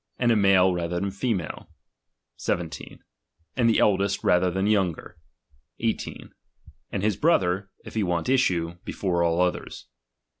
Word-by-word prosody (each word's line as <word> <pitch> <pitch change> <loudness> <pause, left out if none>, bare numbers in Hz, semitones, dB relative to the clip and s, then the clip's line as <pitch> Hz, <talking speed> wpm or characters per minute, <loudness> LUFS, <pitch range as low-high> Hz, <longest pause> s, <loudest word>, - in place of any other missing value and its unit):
And 120 -1 +2
a - - +4
male 95 -3 +4
rather 85 0 -2
than 100 +1 -2
female: 100 -4 -3 0.7
17 - - -4 0.5
And 120 -3 +3
the 115 - +3
eldest 100 -1 +2
rather 90 +1 +3
than 95 +2 -1
the 105 - +3
younger; 90 -4 -1 0.6
18. - - -3 0.6
And 100 - -3
his 105 -1 +2
brother, 100 - +2 0.2
if - - -9
he 110 - 0
want 90 -1 -1
issue, 90 -10 +1
before 90 -3 -1
all 85 0 +1
others. 90 0 -2
95 Hz, 145 wpm, -25 LUFS, 90-105 Hz, 0.7 s, a